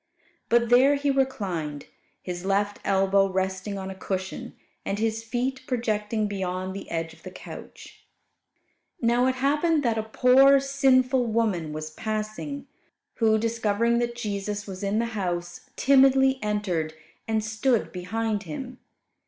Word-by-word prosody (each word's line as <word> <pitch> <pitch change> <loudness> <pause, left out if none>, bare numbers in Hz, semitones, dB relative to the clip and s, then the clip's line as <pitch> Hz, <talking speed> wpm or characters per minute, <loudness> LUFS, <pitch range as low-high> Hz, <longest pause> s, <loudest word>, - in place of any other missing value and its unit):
But 235 0 +3
there 260 +4 +6
He 285 0 +1
reclined, 185 - -2 0.4
His 180 -1 -5
left 200 +1 0
elbow 195 0 +3
resting 190 +1 -2
on 190 0 -5
a - - -8
cushion, 190 0 -5 0.3
and 195 - -2
His 225 +1 -1
feet 250 +3 -2
projecting 220 -4 -1
beyond 185 -2 -3
the 195 - -7
edge 165 0 -3
of - - -19
the - - -8
couch. - - -11 1.0
Now 240 +2 +3
it 260 - +1
happened 295 +4 +2
that 230 -3 +1
a 220 0 -6
poor, 270 +3 +6
sinful 265 -2 +2
woman 215 -8 0
was 155 0 -5
passing, 215 - -4 0.5
who, 220 -2 +4
discovering 230 +1 +1
that 240 0 -1
Jesus 205 -2 -3
was 190 -1 -8
in 200 +1 0
the 230 - +1
house, 175 -3 -4
timidly 265 0 +5
entered, 185 -7 -1 0.3
and 220 -1 0
stood 225 +2 0
behind 210 +4 -2
Him. 245 - -7
220 Hz, 140 wpm, -26 LUFS, 190-250 Hz, 1.0 s, there